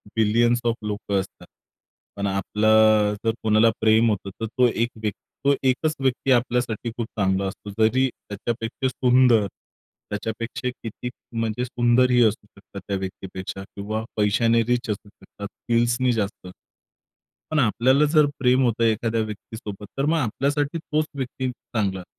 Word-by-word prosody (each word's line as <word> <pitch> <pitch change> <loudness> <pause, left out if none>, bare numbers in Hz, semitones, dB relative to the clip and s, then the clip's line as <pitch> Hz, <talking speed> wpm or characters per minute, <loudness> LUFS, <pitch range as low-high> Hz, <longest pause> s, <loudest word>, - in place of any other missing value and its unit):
Billions 115 +2 +3
of 115 -1 +2
लोकं 105 -1 -1
असतात. 95 - -8 0.7
पण 100 0 -2
आपलं 105 +2 +3
जर 115 - +4
कोणाला 110 +1 +4
प्रेम 110 +1 +4
होतं, 100 -2 -2
तर - - 0
तो 125 -1 +6
एक 120 0 0
व्यक्ती 110 -2 -5 0.2
तो 140 - +6
एकच 155 +5 +1
व्यक्ती 135 0 0
आपल्यासाठी 120 -2 +1
खूप 115 - -2
चांगला 95 0 +1
असतो. 95 +2 -8
जरी 130 +5 +4
त्याच्यापेक्षा 115 +3 -4
सुंदर 125 -3 +4 0.6
त्याच्यापेक्षा 115 +4 -4
किती 115 +2 -5 0.3
म्हणजे 115 +2 -1
सुंदरही 125 +1 +3
असू 110 -1 +1
शकतात 100 -1 -12
त्या 100 - -1
व्यक्तीपेक्षा 95 0 -6
किंवा 110 +2 -3
पैशाने 115 +3 +3
रिच 125 +1 -1
असू 105 0 -4
शकतात, 100 0 -10
स्किल्सनी 120 +3 0
जास्त. 105 -4 -3 1.0
पण 155 - +2
आपल्याला 130 +4 +3
जर 155 -2 +6
प्रेम 130 0 +3
होतं 115 -2 +1
एखाद्या 115 0 +1
व्यक्तीसोबत, 105 -1 -7
तर 135 - +1
मग 160 +2 +2
आपल्यासाठी 145 +4 -1
तोच 155 -1 -1
व्यक्ती 130 -1 -3
चांगला. 100 -6 -3
115 Hz, 140 wpm, -23 LUFS, 105-125 Hz, 1.0 s, तो